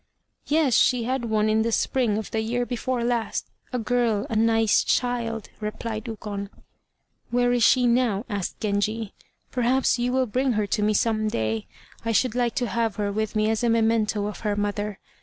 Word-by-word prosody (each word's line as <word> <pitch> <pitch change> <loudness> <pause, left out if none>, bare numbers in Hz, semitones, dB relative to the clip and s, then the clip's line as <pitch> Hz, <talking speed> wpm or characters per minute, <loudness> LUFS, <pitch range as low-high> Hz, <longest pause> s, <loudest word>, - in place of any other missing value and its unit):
"Yes, 300 -4 +2
she 245 +1 +4
had 255 +1 -1
one 215 -1 +1
in 215 0 +3
the 230 +1 0
spring 230 -2 +1
of 220 - -5
the 220 - 0
year 240 +2 -1
before 245 0 -2
last 235 -3 -1 0.3
a 250 - -1
girl, 230 -2 +1
a - - -1
nice 225 0 +3
child," 235 -3 -1
replied 215 +1 -4
Ukon. 205 -3 -5 0.8
"Where 245 0 +2
is 245 - +1
she 250 +3 +5
now?" 235 -3 +2
asked 200 -5 -4
Genji, 210 +1 -1 0.4
"perhaps 255 +1 +2
you 245 +1 0
will 260 0 +2
bring 255 +3 0
her 215 -1 0
to 210 +2 -1
me 210 0 +2
some 215 0 +1
day. 110 - -2 0.4
I 230 0 -1
should 235 +2 +2
like 240 -2 0
to 245 - 0
have 230 -3 -1
her 205 -1 -1
with 215 +1 -2
me 215 0 +2
as 225 +1 -1
a 240 - +3
memento 220 -2 +2
of 210 - -5
her 210 -2 -1
mother. 205 0 -2
225 Hz, 190 wpm, -25 LUFS, 210-245 Hz, 0.8 s, she